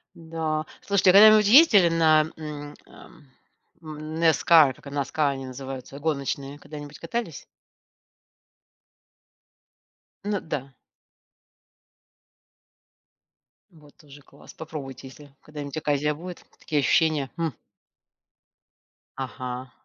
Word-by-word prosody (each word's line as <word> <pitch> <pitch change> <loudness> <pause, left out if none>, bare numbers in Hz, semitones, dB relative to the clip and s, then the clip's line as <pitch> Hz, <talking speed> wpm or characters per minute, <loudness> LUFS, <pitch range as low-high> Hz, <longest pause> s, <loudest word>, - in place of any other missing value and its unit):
Да. 160 -2 -4 0.2
Слушайте, 195 -2 +3
а - - -1
вы 200 - +9
когда 215 +1 +10
нибудь 215 -1 +5
ездили 215 - +7
на, 160 -2 +4
м, 150 -2 -8
эм, 150 -5 -17 0.5
NASCAR? 155 -1 +2
NASCAR, 145 +1 -1
они 135 -1 -6
называются 130 +1 -8
гоночные. 140 -2 -3
Когда-нибудь 145 0 -10
катались? 170 - -5 2.8
Ну 205 -1 -2
да. 135 -3 -6 3.0
Вот 150 -4 -20
тоже 145 -4 -16
класс, - - -17
попробуйте, 140 -5 -8
если 145 +2 -14
когда-нибудь 145 -1 -8
оказия 150 0 0
будет, 175 +3 -10
такие 150 - -2
ощущения, 145 0 +1
м! 165 -4 -2 1.6
Ага. 130 -1 -6
150 Hz, 95 wpm, -25 LUFS, 140-165 Hz, 3.0 s, когда